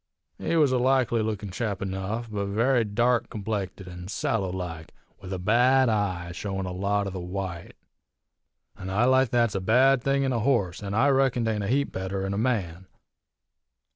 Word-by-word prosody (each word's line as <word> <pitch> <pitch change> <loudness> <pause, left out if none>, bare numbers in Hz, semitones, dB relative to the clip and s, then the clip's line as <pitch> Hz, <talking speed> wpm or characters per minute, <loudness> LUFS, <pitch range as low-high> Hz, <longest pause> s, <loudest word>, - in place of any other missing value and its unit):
He 165 - -1
was 150 -5 +4
a 130 - +2
likely 125 -2 +2
lookin' 105 -2 -3
chap 100 0 -3
enough, 100 +4 -3
but 100 -1 -2
very 115 +5 +2
dark 120 +3 +1
complected 100 -3 -4
an' 90 0 -8
sallow 95 -1 -1
like, 90 -3 -6 0.2
with 95 - -9
a 95 - -2
bad 125 +7 +4
eye, 95 -5 -1
showin' 95 +1 -4
a 90 - -4
lot 100 +2 0
o' 100 - -4
the 95 - -5
white. 90 -1 -5 1.0
An 95 - -7
eye 105 +5 +2
like 130 -1 +4
that's 115 -2 +2
a 95 - -2
bad 125 +6 +4
thing 140 +1 +1
in 135 -1 0
a 115 - 0
horse, 105 -8 0
an' 100 -1 -4
I 135 +6 +4
reckon 135 -3 +2
't 110 - +1
ain't 105 -2 -2
a - - -3
heap 140 +5 +1
better 95 +1 -3
in 95 - -2
a - - -2
man. 95 -7 -1
105 Hz, 195 wpm, -26 LUFS, 95-120 Hz, 1.0 s, was